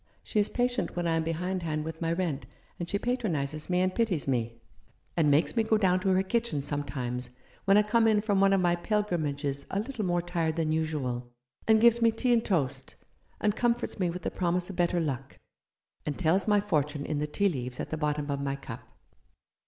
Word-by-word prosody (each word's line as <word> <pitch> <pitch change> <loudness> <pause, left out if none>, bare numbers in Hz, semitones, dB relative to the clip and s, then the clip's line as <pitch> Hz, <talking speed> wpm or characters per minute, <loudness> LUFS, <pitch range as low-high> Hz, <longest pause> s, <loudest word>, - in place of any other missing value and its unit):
She 215 - 0
is 205 - +3
patient 245 0 -1
when 175 0 -1
I 165 -1 +2
am 165 - +1
behindhand 165 -2 -2
with 160 +1 -6
my 165 0 0
rent; 165 -5 -2 0.3
and 175 0 -4
she 200 - +1
patronizes 165 - -2
me 180 0 +2
and 185 0 +1
pities 195 -11 0
me, 115 -3 -1 0.6
and 160 -3 +3
makes 145 +9 +3
me 230 - +4
go 220 0 +2
down 185 -3 +3
to 190 +1 0
her 190 0 +3
kitchen 210 -8 -1
sometimes 130 -4 -3 0.4
when 195 +1 +6
I 210 - +6
come 225 +2 +3
in 215 -1 +4
from 205 -2 +1
one 195 0 +5
of 195 - +4
my 175 -1 +3
pilgrimages 155 -8 -1
a 195 - -1
little 230 0 -3
more 175 -2 +1
tired 170 -3 -1
than 160 -2 0
usual, 140 -7 -2 0.4
and 220 0 +6
gives 235 +1 +5
me 230 - +6
tea 240 +2 +1
and 230 -1 +3
toast, 135 -8 -1 0.4
and 210 -1 +1
comforts 240 -1 0
me 180 -2 +1
with 180 +1 -5
the - - -2
promise 180 +1 -1
of - - -9
better 175 0 +1
luck, 135 -5 -3 0.7
and 150 - -3
tells 185 +4 +2
my 210 -1 +5
fortune 150 -7 -1
in 150 -2 -2
the 150 - -1
tea 200 +7 +1
leaves 125 -5 -5
at - - -4
the - - 0
bottom 150 -1 -1
of 140 0 -2
my 140 0 -1
cup. 140 - -8
175 Hz, 215 wpm, -29 LUFS, 150-205 Hz, 0.7 s, when